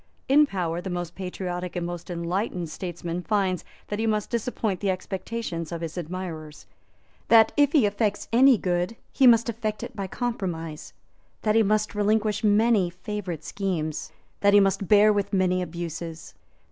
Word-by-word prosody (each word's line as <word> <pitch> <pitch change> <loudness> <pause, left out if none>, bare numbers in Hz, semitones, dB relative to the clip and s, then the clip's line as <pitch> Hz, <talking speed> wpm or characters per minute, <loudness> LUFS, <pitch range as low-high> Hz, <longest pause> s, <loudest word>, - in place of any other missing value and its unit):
In 295 +2 +6
power 175 -6 -2
the 190 - -5
most 175 -1 -4
patriotic 180 -1 -5
and 175 -1 -2
most 175 0 -6
enlightened 175 0 -2
statesman 175 -1 -5
finds 190 -2 0 0.3
that 210 - -3
he 225 - 0
must 215 -1 -1
disappoint 225 -4 -1
the 200 - -1
expectations 185 -2 -4
of 170 -1 -4
his 165 -1 -5
admirers; 165 -3 -6 0.6
that, 225 -1 +6
if 290 -2 +4
he 285 -8 +5
effects 205 0 -1
any 260 +1 +7
good, 180 +3 -1 0.2
he 265 - +4
must 235 -1 +6
effect 220 -2 -3
it - - -7
by 195 -2 -3
compromise; 180 -10 -4 0.5
that 215 - +2
he 225 - +5
must 215 0 +1
relinquish 210 +1 +1
many 210 -2 +4
favourite 180 - -5
schemes; 155 -6 -3 0.3
that 200 0 +4
he - - +9
must 195 -1 +1
bear 210 +2 +6
with 205 -1 -2
many 185 -1 +2
abuses. 170 -1 -6
190 Hz, 160 wpm, -25 LUFS, 175-215 Hz, 0.6 s, he